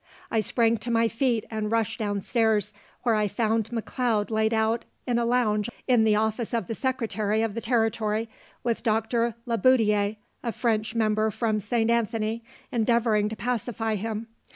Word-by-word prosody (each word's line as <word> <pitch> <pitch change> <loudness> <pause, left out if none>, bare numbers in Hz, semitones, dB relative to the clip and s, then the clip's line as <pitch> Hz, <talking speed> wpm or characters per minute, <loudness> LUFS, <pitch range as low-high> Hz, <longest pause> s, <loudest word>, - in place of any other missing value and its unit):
I 225 - +2
sprang 230 +1 +2
to 230 +3 -5
my 230 0 +3
feet, 230 -1 0
and 215 -1 -2
rushed 225 -1 0
down 205 -2 -1
stairs, 220 -2 +1 0.3
where 235 -2 +3
I 210 -1 +2
found 225 +1 0
McLeod 230 -2 -1
laid 220 0 +2
out 225 +1 +1 0.2
on 240 -1 +2
a 235 - +1
lounge 230 -3 +1 0.2
in 245 -4 +4
the 215 -1 +4
office 220 +2 0
of 230 - -1
the 225 - -4
secretary 225 -4 -1
of 225 -2 -1
the 230 - -4
territory, 225 -2 0 0.4
with 235 -2 0
Doctor 230 +1 +1
Le 230 -2 -1
Boutillier, 215 -5 +3 0.2
a 235 - -2
French 220 -2 -1
member 215 -1 +2
from 215 0 0
St. 225 +2 +1
Anthony, 225 0 0 0.3
endeavoring 225 -2 +2
to 220 - -5
pacify 230 -2 -2
him. 215 +2 -3
225 Hz, 170 wpm, -26 LUFS, 215-235 Hz, 0.4 s, in